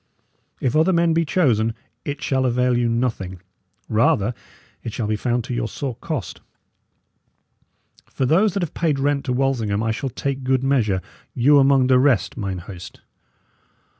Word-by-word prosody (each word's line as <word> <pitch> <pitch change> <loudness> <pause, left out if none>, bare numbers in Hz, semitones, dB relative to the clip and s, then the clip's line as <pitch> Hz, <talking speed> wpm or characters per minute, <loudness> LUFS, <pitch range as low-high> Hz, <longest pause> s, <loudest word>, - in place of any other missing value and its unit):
If 125 - -1
other 160 +4 +4
men 170 -2 +3
be 165 0 +2
chosen, 115 - +1 0.3
it 145 -1 -5
shall 130 -1 +1
avail 125 0 +1
you 120 -1 +1
nothing; 115 -6 -2 0.5
rather 110 0 +2 0.5
it 115 - -6
shall 115 - -2
be 105 +1 0
found 120 +2 -1
to 125 - -5
your 120 - -1
sore 135 +2 -4
cost. 130 - -5 1.7
For 130 - -2
those 185 +9 +3
that 195 - 0
have 165 - -4
paid 160 -4 0
rent 140 0 0
to 130 - -2
Walsingham 120 -6 0
I 115 - 0
shall 135 +5 -3
take 135 +2 -3
good 130 0 +1
measure 110 -9 +1 0.3
you 140 +4 +5
among 135 -1 +4
the 130 0 +4
rest, 130 -8 +2
mine 100 -5 -3
host." 90 0 -10
125 Hz, 165 wpm, -22 LUFS, 115-140 Hz, 1.7 s, you